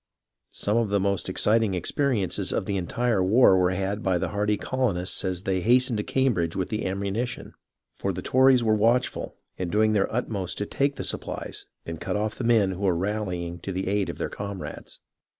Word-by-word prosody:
Some 105 +2 +1
of 115 -3 +1
the 100 0 +2
most 100 -1 0
exciting 105 +1 +2
experiences 105 - 0
of - - -1
the 100 - -2
entire 105 +2 0
war 100 +1 +6
were 90 -1 +3
had 95 +3 -2
by 95 -2 +1
the - - -2
hardy 105 0 0
colonists 100 -10 -1
as 95 -1 -2
they 95 -1 0
hastened 125 +2 +3
to 105 - -1
Cambridge 105 -13 0
with 95 - -2
the 110 -3 -2
ammunition, 100 +5 -3 0.5
for - - 0
the - - -6
Tories 130 -1 +4
were 110 -1 +3
watchful, 115 +4 +1 0.2
and 90 -2 -2
doing 110 +1 +3
their 100 -2 +1
utmost 105 -6 -2
to 105 - -2
take 140 +6 0
the - - -5
supplies, - - -5 0.2
and 85 -1 -6
cut - - -2
off 105 +1 -1
the - - -6
men 110 -5 +3
who 95 +1 -6
were 95 -4 +2
rallying 90 -3 -3
to 95 - -5
the 95 0 -3
aid 100 0 0
of - - -5
their - - -2
comrades. 100 -2 -7
100 Hz, 200 wpm, -26 LUFS, 95-115 Hz, 0.5 s, war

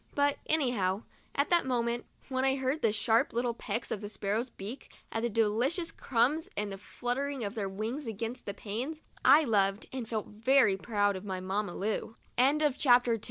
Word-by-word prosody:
But 285 0 +2
anyhow, 235 -10 +1 0.3
at 280 +5 +1
that 345 -1 +5
moment, 235 -1 0 0.2
when 260 -1 -1
I 265 0 +3
heard 265 +3 -1
the 225 - +3
sharp 225 +5 +2
little 240 0 0
pecks 230 0 -4
of 210 - -2
the 205 - -5
sparrows' 215 +4 -2
beaks 225 +4 -8 0.2
at 225 - -1
the 235 - 0
delicious 235 - +1
crumbs, 275 +6 +1
and 205 0 -1
the 195 - -6
fluttering 260 +5 -3
of 200 0 -3
their 205 -4 -2
wings 225 +8 -4
against 225 +3 -5
the 200 - -2
panes, 245 +11 -4 0.2
I 315 - +7
loved 200 -4 +2
and 245 -4 -4
felt 220 -2 -2
very 225 0 +3
proud 205 0 +1
of 185 - -6
my 190 -2 -3
Mamm 200 +3 -2
230 Hz, 170 wpm, -31 LUFS, 205-265 Hz, 0.3 s, I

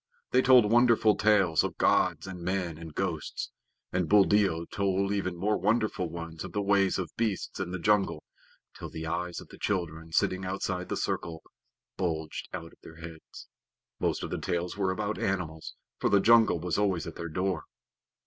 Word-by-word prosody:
They 130 - +5
told 125 -5 +6
wonderful 115 -2 +5
tales 100 -6 +3
of - - -4
gods - - +2
and 95 -2 -7
men 90 -3 -2
and 80 -2 -9
ghosts; 85 -5 -3 0.4
and 90 -3 0
Buldeo 100 -4 +4
told 100 +1 0
even 90 -3 -2
more 105 +4 0
wonderful 105 -3 0
ones 85 -1 -7
of 95 - -8
the 105 - 0
ways 100 -1 +3
of 90 -2 -5
beasts 110 -5 -2
in 95 -2 -2
the 95 - -3
jungle, 100 -4 +1 0.5
till - - -7
the 80 0 -6
eyes 85 +2 -3
of - - -12
the - - -13
children 80 -5 -2
sitting 95 +3 +1
outside 95 -1 -3
the - - -2
circle 80 -1 -3 0.5
bulged 80 -4 -3
out 85 -2 -7
of - - -23
their 80 - -12
heads. 80 0 -11 0.5
Most - - 0
of - - -5
the - - -3
tales 85 0 -2
were 95 -2 0
about 100 +3 -2
animals, 85 -5 -3 0.2
for - - +1
the 100 - +5
jungle 110 -4 +5
was 90 +2 -1
always 95 -6 +1
at 85 - -6
their 85 - -5
door. 90 +1 -2
95 Hz, 180 wpm, -29 LUFS, 85-100 Hz, 0.5 s, told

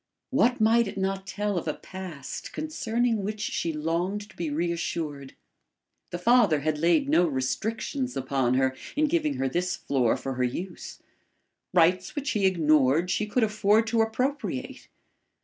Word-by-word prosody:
What 255 -2 +3
might 225 +1 +4
it 195 - -7
not 195 0 -2
tell 205 -1 -1
of 165 - -9
a 155 - -1
past 180 -7 -8
concerning 240 -7 -1
which 210 +2 -4
she 180 -5 -2
longed 170 +7 -2
to - - -21
be 170 -3 -3
reassured? 160 -3 -3 0.7
The 175 - -4
father 205 - +4
had 155 0 -1
laid 175 - +3
no 180 - +4
restrictions 220 - -2
upon 130 -2 0
her, 130 0 +2 0.2
in 305 +2 +3
giving 305 -2 0
her 135 - 0
this 175 +7 -1
floor 125 -5 +1
for 135 - -4
her 130 0 -1
use. 175 +9 -5 0.7
Rights 180 +1 +3
which 290 0 -2
he 200 -3 +2
ignored 155 -1 +3
she 215 - 0
could 230 +3 +1
afford 215 +1 +3
to 230 0 +2
appropriate. 250 +6 -2
190 Hz, 155 wpm, -27 LUFS, 155-225 Hz, 0.7 s, might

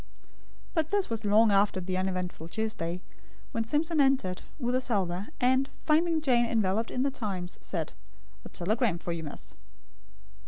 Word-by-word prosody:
But 320 -3 +1
this 405 - +1
was 225 -1 -2
long 215 +2 +5
after 200 -1 +3
the 185 0 -3
uneventful 185 -3 -2
Tuesday, 180 -3 -3 0.5
when 225 - 0
Simpson 300 +6 +2
entered, 265 -10 +2 0.2
with 245 -4 -1
a 255 - +2
salver; 195 -6 0
and, 260 +2 +3 0.2
finding 325 +1 +3
Jane 245 -5 +3
enveloped 220 -1 +1
in 255 - 0
the 275 - +1
Times, 190 -8 -4
said: 165 -5 -3 0.5
"A - - -9
telegram 210 +1 +1
for 170 - -4
you, 170 -1 -3
miss." 150 -3 -7
220 Hz, 155 wpm, -29 LUFS, 185-260 Hz, 0.5 s, long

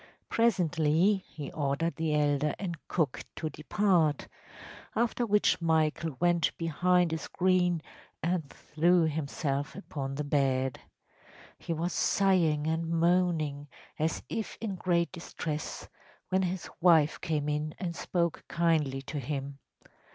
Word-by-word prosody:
Presently 180 -4 +3
he 145 -3 -7
ordered 145 +3 -1
the 160 -2 0
elder 145 0 +1
and 180 -4 -3
cook 155 -7 -1
to 155 -1 -3
depart, 165 -1 +1 0.7
after 235 +1 +1
which 210 -3 +3
Michael 160 -2 +1
went 175 -2 +2
behind 175 +1 +2
a 160 - -1
screen 180 -2 +1 0.4
and 170 -3 0
threw 170 +3 +2
himself 145 -2 -2
upon 140 -8 -5
the 150 - -2
bed. 135 -3 +1 0.8
He - - -5
was 165 +2 -1
sighing 170 -7 +2
and 160 +1 -1
moaning, 165 -4 +1 0.3
as 160 +2 -1
if 220 - -4
in 215 -3 -3
great 175 -2 0
distress, 160 -3 -5 0.4
when 190 0 +2
his 185 0 -2
wife 160 -4 +4
came 150 -3 -1
in 150 +1 -2
and 170 -3 -4
spoke 170 -1 -1
kindly 155 -6 +1
to 145 +2 -4
him. 140 +1 -4
160 Hz, 125 wpm, -30 LUFS, 150-180 Hz, 0.8 s, wife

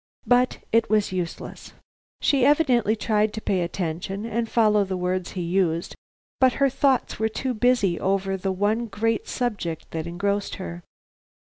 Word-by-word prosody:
But 245 +2 +3
it 230 0 +3
was 215 -2 +2
useless. 180 -2 -5 0.5
She 275 -3 +3
evidently 255 -7 +3
tried 215 -1 +1
to 220 - -4
pay 190 -4 0
attention 180 +3 -3
and 230 0 -2
follow 210 -3 +3
the 190 -1 -3
words 180 0 -2
he 180 - -3
used, 170 -1 0 0.4
but 260 -1 +5
her 275 +2 +2
thoughts 265 -4 +1
were 220 0 +1
too 255 +3 -2
busy 215 -6 +2
over 195 0 0
the 190 0 -2
one 210 +5 0
great 225 +2 -1
subject 205 -10 -3
that 160 0 -4
engrossed 200 +4 -2
her. 85 0 -7
205 Hz, 155 wpm, -24 LUFS, 185-230 Hz, 0.5 s, but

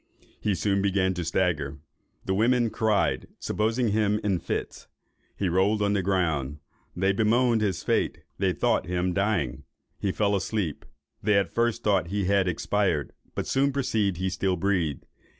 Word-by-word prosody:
He 105 -2 0
soon 100 +3 +1
began 95 -1 +1
to 90 -1 -3
stagger; 80 -5 0 0.5
the 95 - 0
women 115 +3 +2
cried, 110 -2 +1
supposing 115 +2 0
him 105 0 +1
in 100 -4 +1
fits; - - -4 0.5
he 100 - -1
rolled 100 +4 +2
on 100 0 +2
the 100 - +1
ground; 80 -7 0 0.4
they 95 +2 +2
bemoan 115 +3 +3
his 100 -5 -1
fate; - - 0 0.2
they - - +2
thought - - +1
him 90 0 0
dying. 100 - 0 0.4
He 100 - 0
fell 100 +1 +1
asleep. 95 -5 -2 0.4
They 105 0 +3
at 100 -1 0
first 115 0 0
thought 100 -5 +2
he 100 +2 -1
had 100 0 +2
expired, 90 -3 0 0.2
but - - -2
soon 140 +1 +2
perceived 110 -9 0
he 95 +1 -1
still 95 0 0
breathed. 85 -6 -1
100 Hz, 160 wpm, -26 LUFS, 90-105 Hz, 0.5 s, bemoan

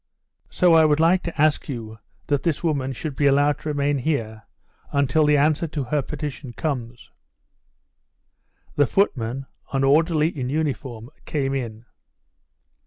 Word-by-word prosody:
"So 180 -2 +3
I 160 -1 +7
would 150 -1 +3
like 170 +3 +4
to 170 -3 -6
ask 155 0 +2
you 110 -4 -6 0.3
that 145 -2 0
this 165 -2 -1
woman 140 -5 0
should 140 +3 -5
be 145 - +2
allowed 145 +1 +3
to 155 - -5
remain 145 -1 0
here 110 -7 -3 0.4
until 140 +2 +2
the 150 0 +4
answer 155 +3 +2
to 150 -2 -3
her 145 +4 0
petition 145 -3 -6
comes." 120 -6 -4 1.6
The 145 -2 +3
footman, 135 - 0 0.3
an 135 0 0
orderly 155 +3 +3
in 130 -7 -4
uniform, 135 -5 -3
came 135 -3 -1
in. 115 -4 -5
145 Hz, 145 wpm, -23 LUFS, 130-155 Hz, 1.6 s, I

